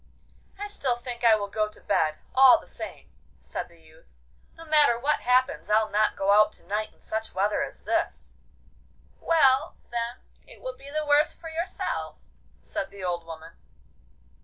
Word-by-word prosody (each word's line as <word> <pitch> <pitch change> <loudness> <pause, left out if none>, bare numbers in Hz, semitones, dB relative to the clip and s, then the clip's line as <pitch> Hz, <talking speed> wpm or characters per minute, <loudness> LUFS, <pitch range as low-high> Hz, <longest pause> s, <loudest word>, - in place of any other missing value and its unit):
'I 410 - -5
still 270 -12 0
think 240 0 -6
I 230 -2 +7
will 205 -1 -3
go 215 +1 -1
to 210 - -13
bed, 155 -1 +1 0.2
all 265 +4 +8
the - - -15
same,' - - -9 0.3
said - - -6
the 170 -1 -21
youth. 160 0 -21 0.5
'No 330 - -11
matter 300 -6 +4
what 285 +5 +1
happens, 255 +3 +1
I'll 215 +1 +3
not 215 +1 +2
go 195 +1 +1
out 210 +1 +6
to - - -13
night 210 +3 -2
in - - -30
such 220 -2 -4
weather 200 +2 +1
as - - -5
this.' - - -2 0.9
'Well, 270 -5 +3 0.2
then, 235 0 -2 0.3
it - - -15
will - - -6
be 275 - -12
the 305 +1 -2
worse 295 +1 +3
for 325 - -9
yourself,' 335 +3 -3 0.5
said 195 - -4
the 195 -1 -11
old 175 -2 -3
woman. 165 0 -10
230 Hz, 175 wpm, -26 LUFS, 200-280 Hz, 0.9 s, all